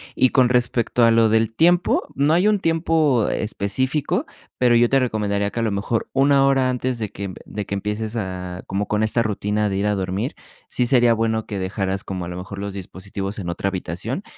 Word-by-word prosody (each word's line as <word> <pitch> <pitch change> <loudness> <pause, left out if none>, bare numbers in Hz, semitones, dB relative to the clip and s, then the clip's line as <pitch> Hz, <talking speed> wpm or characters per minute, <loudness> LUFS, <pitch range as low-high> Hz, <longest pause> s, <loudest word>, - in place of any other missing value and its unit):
Y 130 - +3
con 130 -3 +4
respecto 120 -1 +2
a 115 - +5
lo 115 -1 +4
del 110 0 +2
tiempo, 175 +6 +3
no 145 +3 +2
hay 185 +5 +4
un 210 -2 +2
tiempo 160 - +2
específico, 130 +7 -1 0.3
pero 125 -1 +4
yo 120 0 +4
te 135 - +4
recomendaría 100 -4 -1
que 115 - -3
a - - 0
lo 110 - 0
mejor 100 +3 -2
1 135 0 +4
hora 135 -1 +3
antes 125 -1 -2
de 105 -3 -4
que 100 - -6
emp 95 -2 -6
de 105 -1 -5
que 100 - -3
empieces 105 +3 -3
a 90 -3 -5
como 100 +2 -2
con 105 0 +1
esta 115 +2 +2
rutina 105 0 -1
de 95 - -2
ir 100 +1 0
a 105 - +1
dormir, 95 - -3 0.3
sí 125 - 0
sería 120 -2 +4
bueno 110 -1 0
que 100 -2 -5
dejaras 95 0 -2
como 90 -2 -5
a - - -7
lo 90 - -6
mejor 95 +2 -7
los 100 -1 -4
dispositivos 100 +2 -6
en 90 - -5
otra 90 +3 -1
habitación 100 - -4
110 Hz, 215 wpm, -22 LUFS, 100-125 Hz, 0.3 s, a